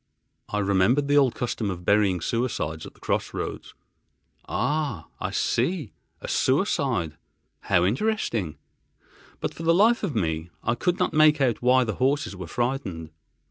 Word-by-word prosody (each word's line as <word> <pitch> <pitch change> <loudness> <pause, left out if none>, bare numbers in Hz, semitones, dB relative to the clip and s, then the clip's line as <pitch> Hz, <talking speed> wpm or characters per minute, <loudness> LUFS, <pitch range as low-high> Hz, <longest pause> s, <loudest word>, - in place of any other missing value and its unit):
I 105 - -2
remembered 100 +8 +2
the 145 0 +3
old 135 -4 +4
custom 115 -3 -2
of 90 -2 -6
burying 100 -4 +3
suicides 95 -9 -2
at - - -13
cross - - -2
roads: - - -5 0.7
"Ah! 145 - -1
I - - -2
see, 135 - -1 0.3
a - - -6
suicide. 130 - 0 0.4
How 85 - +2
interesting!" 115 - -1 0.8
But - - -2
for - - -10
the 165 0 +3
life 225 +5 +4
of 185 -9 -3
me 80 -1 -1
I 115 - +1
could 180 +8 0
not - - 0
make 155 0 +5
out 125 -5 +1
why 125 +1 +4
the 110 -4 -3
horses 135 -4 +1
were 90 -2 -7
frightened. 105 - -3
120 Hz, 150 wpm, -25 LUFS, 95-145 Hz, 0.8 s, make